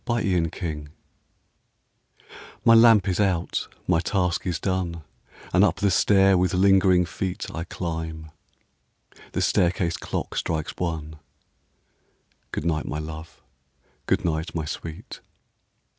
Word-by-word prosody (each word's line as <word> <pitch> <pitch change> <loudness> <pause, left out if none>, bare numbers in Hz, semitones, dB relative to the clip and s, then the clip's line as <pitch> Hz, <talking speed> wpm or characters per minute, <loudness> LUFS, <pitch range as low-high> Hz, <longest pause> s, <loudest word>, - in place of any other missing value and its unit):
A 120 - +1
LATE 90 -8 +1
GOOD - - -9
NIGHT 75 -3 -4 1.8
My 115 - +7
lamp 115 -4 +6
is 95 0 0
out, 95 -4 0 0.2
my 90 -2 +2
task 90 0 -1
is 85 -3 -1
done, 90 -4 -2 0.5
And - - +5
up - - +3
the 100 -1 +1
stair 95 -1 +4
with 90 +1 +1
lingering 95 -1 +4
feet 90 +2 -4
I 85 +1 -4
climb. 80 -2 -5 1.0
The - - 0
staircase 85 -1 +1
clock - - -4
strikes 80 -2 -2
one. 80 -3 -3 1.3
Good - - -4
night, 80 -2 0
my 75 - -3
love! 80 +1 -8 0.6
good - - +1
night, 80 +1 -2
my 80 -2 -2
sweet! 80 +1 -7
85 Hz, 130 wpm, -24 LUFS, 80-95 Hz, 1.8 s, My